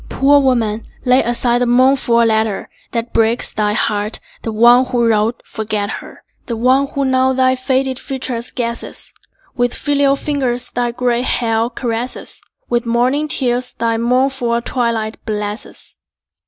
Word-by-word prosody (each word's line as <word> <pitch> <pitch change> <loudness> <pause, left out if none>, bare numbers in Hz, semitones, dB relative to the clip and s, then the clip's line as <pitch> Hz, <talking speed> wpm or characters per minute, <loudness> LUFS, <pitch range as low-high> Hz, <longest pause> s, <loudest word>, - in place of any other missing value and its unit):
Poor 285 +2 +4
woman, 230 -5 +1 0.2
lay 255 +1 +5
aside 240 0 0
the 245 - +2
mournful 255 0 +3
letter 220 -2 0 0.2
That 235 0 -3
breaks 225 +1 +1
thy 210 -1 0
heart; 210 0 0 0.2
the 225 - -4
one 240 +3 +5
who 240 -2 +1
wrote, 220 +1 +1
forget 215 -1 -3
her: - - -14 0.2
The 235 - -3
one 260 +4 +3
who 280 -1 -2
now 260 0 +2
thy 260 0 +3
faded 260 0 -1
features 255 -3 -4
guesses, 235 -2 -4 0.4
With 245 -1 0
filial 285 -1 +2
fingers 265 -4 -2
thy 245 0 -1
gray 245 0 0
hair 230 -2 +1
caresses, 240 0 -4 0.3
With 240 -1 -1
morning 250 +6 +1
tears 250 -4 +1
thy 230 -1 -1
mournful 250 0 +1
twilight 230 -4 -2
blesses. 210 +1 -5
240 Hz, 140 wpm, -17 LUFS, 230-260 Hz, 0.4 s, lay